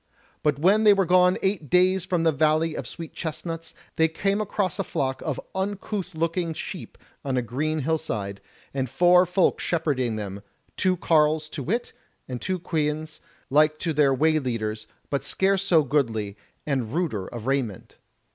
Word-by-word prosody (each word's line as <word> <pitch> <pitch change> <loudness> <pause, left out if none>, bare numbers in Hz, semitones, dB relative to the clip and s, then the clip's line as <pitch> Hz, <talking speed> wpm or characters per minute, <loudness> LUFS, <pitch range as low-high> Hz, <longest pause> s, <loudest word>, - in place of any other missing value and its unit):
But 150 -2 +1
when 195 +8 +4
they 210 -1 +8
were 195 -1 +2
gone 180 +1 +4
eight 190 -7 -1
days 185 +2 +3
from 180 -3 0
the 165 - +4
Valley 155 +2 +2
of - - -5
Sweet 165 -2 -8
chestnuts, 165 0 -5 0.2
they 160 - +5
came 195 +6 0
across 200 -4 -2
a - - +1
flock 135 -7 -2
of 155 -6 -3
uncouth 195 -1 -3
looking 165 0 -1
sheep - - -7 0.3
on 135 -2 -1
a 125 - +1
green 150 +6 -2
hill 160 +3 +1
side, 100 -10 -4 0.3
and 130 -2 -2
four 180 +5 +5
folk 180 +1 +2
shepherding 140 -9 0
them, 100 -2 -5 0.3
two 185 -2 +1
carles 155 -2 +2
to 155 - -5
wit, 225 - -2 0.3
and 125 -2 -5
two 185 0 -1
queans, 155 -2 -2 0.3
like 155 +2 +4
to 165 0 -2
their 145 -2 +4
way 155 +4 +3
leaders, 110 -5 -3 0.2
but 140 - 0
scarce 195 0 +1
so 175 -5 +4
goodly, 115 -8 0 0.3
and 130 -7 -1
ruder 140 - -1
of 115 -2 -8
raiment. 130 -7 -2
155 Hz, 170 wpm, -25 LUFS, 135-180 Hz, 0.3 s, they